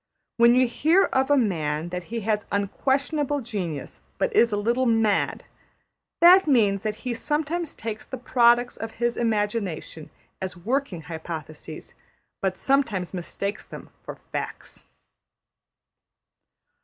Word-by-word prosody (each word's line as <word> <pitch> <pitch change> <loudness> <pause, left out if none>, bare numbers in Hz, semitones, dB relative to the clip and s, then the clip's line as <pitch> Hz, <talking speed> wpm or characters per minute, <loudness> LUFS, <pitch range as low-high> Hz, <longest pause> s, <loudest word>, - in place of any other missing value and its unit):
When 235 +1 +6
you 255 0 +4
hear 325 +10 +3
of 265 +1 +2
a 290 - +5
man 160 - 0
that 180 0 -5
he 230 0 -4
has 210 0 -1
unquestionable 280 +8 0
genius 185 - -5 0.2
but 470 -3 -1
is 235 - +5
a 205 - 0
little 240 +5 +1
mad, 225 -3 +1 0.8
that 360 +1 +8
means 210 -8 +3
that 215 0 -2
he 250 - -1
sometimes 310 +6 -2
takes 220 -1 -5
the 260 - -7
products 240 0 +3
of 225 0 -6
his 240 0 -1
imagination 205 -8 -2 0.3
as 190 -1 -4
working 225 -2 -2
hypotheses, 160 -1 -8 0.5
but 190 -1 -1
sometimes 225 -11 0
mistakes 200 +3 -4
them - - -11
for - - -8 0.2
facts. - - -6
225 Hz, 130 wpm, -25 LUFS, 190-260 Hz, 0.8 s, that